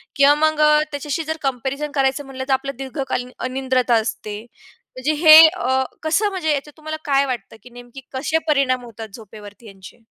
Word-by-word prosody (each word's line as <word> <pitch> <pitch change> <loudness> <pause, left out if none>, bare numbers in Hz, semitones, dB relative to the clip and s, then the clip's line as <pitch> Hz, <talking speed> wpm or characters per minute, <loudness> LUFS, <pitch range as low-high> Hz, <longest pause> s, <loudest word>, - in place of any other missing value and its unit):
किंवा 280 +1 +5
मग 310 0 +1
अ, 300 0 +5
त्याच्याशी 290 +2 -3
जर 315 +1 -4
कम्पॅरिझन 275 +2 -3
करायचं 275 +1 0
म्हटलं, 265 -1 -7
तर 270 - +1
आपलं 275 +1 -2
दीर्घकालीन 265 -2 -4 0.2
अनिद्रता 255 -2 0
असते. 215 -2 -3 0.6
म्हणजे 260 +4 -1
हे 310 0 +11
अ, 260 -3 -1 0.2
कसं, 390 +7 +1
म्हणजे 360 -6 -2
याच्यात 290 +1 -6
तुम्हाला 310 0 -6
काय 280 -1 +2
वाटतं 235 -6 -6
की 250 - -14
नेमकी 245 +2 -13
कसे 265 +5 -1
परिणाम 270 -4 +1
होतात 225 -1 -9
झोपेवरती 210 0 -13
यांचे? 195 +4 -15
270 Hz, 170 wpm, -20 LUFS, 245-300 Hz, 0.6 s, हे